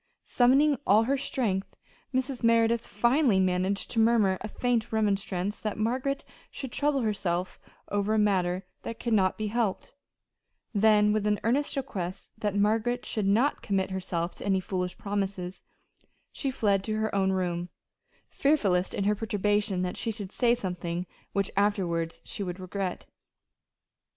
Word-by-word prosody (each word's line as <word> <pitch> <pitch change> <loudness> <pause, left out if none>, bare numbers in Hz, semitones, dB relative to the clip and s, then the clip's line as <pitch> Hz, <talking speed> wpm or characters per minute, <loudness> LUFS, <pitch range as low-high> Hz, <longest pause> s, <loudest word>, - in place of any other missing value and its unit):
Summoning 270 +3 +4
all 210 +3 +6
her 270 +4 +1
strength, 230 -8 -2 0.4
Mrs. 260 -1 -2
Merideth 230 0 +3
finally 240 0 +3
managed 185 +1 0
to 230 - 0
murmur 220 -4 +3
a 215 - -4
faint 235 0 -1
remonstrance 205 -2 -1
that 215 -1 -3
Margaret 255 +5 -1 0.3
should 265 -3 -6
trouble 285 -2 +1
herself 185 -5 -1 0.3
over 205 +1 0
a - - +2
matter 190 -3 +1 0.2
that 230 - -6
could 235 - -1
not 190 -3 +3
be 215 - -2
helped; 225 -3 -1 0.8
then 210 0 +4
with 215 -1 0
an 210 -1 +1
earnest 270 +6 +2
request 190 -10 -4
that 205 -2 -1
Margaret 220 +4 +1
should 210 -3 -1
not 235 +9 +2
commit 195 -1 -1
herself 180 -2 -2
to - - -7
any 195 -1 +3
foolish 180 -1 -3
promises, 195 -2 -3 0.7
she 275 - -2
fled 205 -7 +1
to 215 - -1
her 220 0 -1
own 190 -1 +2
room, 175 -2 -1 0.6
fearful 280 -9 +2
lest, 180 +1 0
in 200 - -1
her 205 +1 +3
perturbation, 205 -3 0
she - - -2
should 205 -3 -5
say 240 +1 +3
something 180 -3 -4 0.3
which 200 0 +1
she 185 -3 -1
would 180 -2 -4
afterward - - -17
regret. 185 0 -4
205 Hz, 150 wpm, -28 LUFS, 190-230 Hz, 0.8 s, all